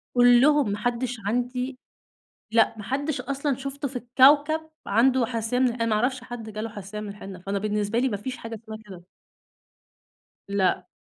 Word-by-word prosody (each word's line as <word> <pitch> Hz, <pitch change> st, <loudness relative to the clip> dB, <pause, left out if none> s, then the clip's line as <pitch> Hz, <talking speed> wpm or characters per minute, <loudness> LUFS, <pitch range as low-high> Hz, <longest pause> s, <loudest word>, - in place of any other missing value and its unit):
كلهم 245 Hz, +2 st, +6 dB
ماحدش 240 Hz, +3 st, -2 dB
عندي 250 Hz, +3 st, -2 dB, 0.7 s
لأ، 225 Hz, 0 st, +4 dB
ما -, -, -6 dB
حدش 285 Hz, +4 st, -2 dB
أصلًا 275 Hz, -1 st, -1 dB
شفته 275 Hz, +1 st, -4 dB
في 250 Hz, -, -8 dB
الكوكب، 290 Hz, +6 st, +4 dB, 0.2 s
عنده 240 Hz, +3 st, +3 dB
حساسية 230 Hz, 0 st, -1 dB
من 255 Hz, -1 st, +4 dB
ال -, -, -1 dB
أنا 230 Hz, -1 st, -1 dB
ما 220 Hz, -, +2 dB
أعرفش 255 Hz, +3 st, 0 dB
حد 240 Hz, -3 st, -7 dB
جاله 215 Hz, +2 st, -4 dB
حساسية 205 Hz, 0 st, -7 dB
من 210 Hz, -, -6 dB
الحنة، 195 Hz, -2 st, -8 dB
فأنا 195 Hz, +2 st, -2 dB
بالنسبة 210 Hz, +2 st, -1 dB
لي 260 Hz, +1 st, +2 dB
ما 205 Hz, -, -2 dB
فيش 255 Hz, +5 st, -5 dB
حاجة 230 Hz, 0 st, -7 dB
اسمها 220 Hz, 0 st, -7 dB
كده. 185 Hz, -3 st, -10 dB, 1.5 s
لأ، 185 Hz, -2 st, +1 dB
240 Hz, 170 wpm, -25 LUFS, 210-260 Hz, 1.5 s, كلهم